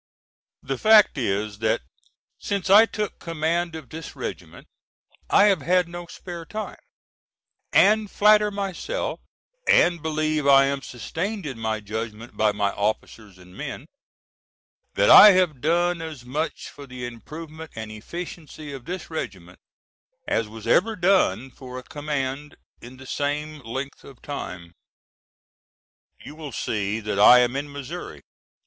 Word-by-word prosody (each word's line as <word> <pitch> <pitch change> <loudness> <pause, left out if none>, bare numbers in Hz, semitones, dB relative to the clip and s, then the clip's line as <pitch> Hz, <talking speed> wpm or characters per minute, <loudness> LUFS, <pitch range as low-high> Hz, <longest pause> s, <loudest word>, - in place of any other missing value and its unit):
The 135 -1 -3
fact 215 -1 +6
is 105 -2 -2
that 110 0 +1 0.6
since 200 -1 -2
I 215 +3 +8
took 210 -2 -4
command 165 +1 -1
of 155 -6 -9
this 160 +3 -8
regiment - - -7 0.6
I - - +6
have 195 -6 +4
had 180 +5 +2
no 175 0 -8
spare 170 -1 -8
time, 215 +6 -6 0.9
and 215 0 +4
flatter 210 +1 +4
myself, 200 - -4 0.5
and 175 -2 +4
believe 155 -1 -1
I 135 0 +7
am 140 0 -1
sustained 175 - -5
in 130 -5 -6
my 110 -1 -2
judgment 110 +2 -6
by 110 -1 +3
my 100 -1 0
officers 105 -1 -3
and 90 0 -16
men, 140 +1 -6 1.1
that - - +4
I 210 -1 +11
have 175 -8 +1
done 175 +2 +1
as 155 -6 -8
much 150 +6 -3
for 140 -1 -12
the 125 -1 -7
improvement 155 +7 -9
and 110 -1 -6
efficiency 155 +4 -8
of 130 -3 -9
this 180 +1 -6
regiment 95 - -6 0.7
as 115 - 0
was 110 0 -11
ever 220 +4 +3
done 175 - +2
for 125 +1 -10
a 130 - -7
command 145 0 -4 0.3
in 125 +2 -12
the 130 - -12
same 150 +3 -3
length 135 +3 -6
of 135 -3 -14
time. 90 -12 -7 1.5
You 140 - -11
will 155 -2 -8
see 105 +1 -2
that 105 -2 -3
I 125 +4 +9
am 125 +1 +1
in 145 +1 -4
Missouri. 140 - -8
145 Hz, 140 wpm, -24 LUFS, 115-170 Hz, 1.5 s, I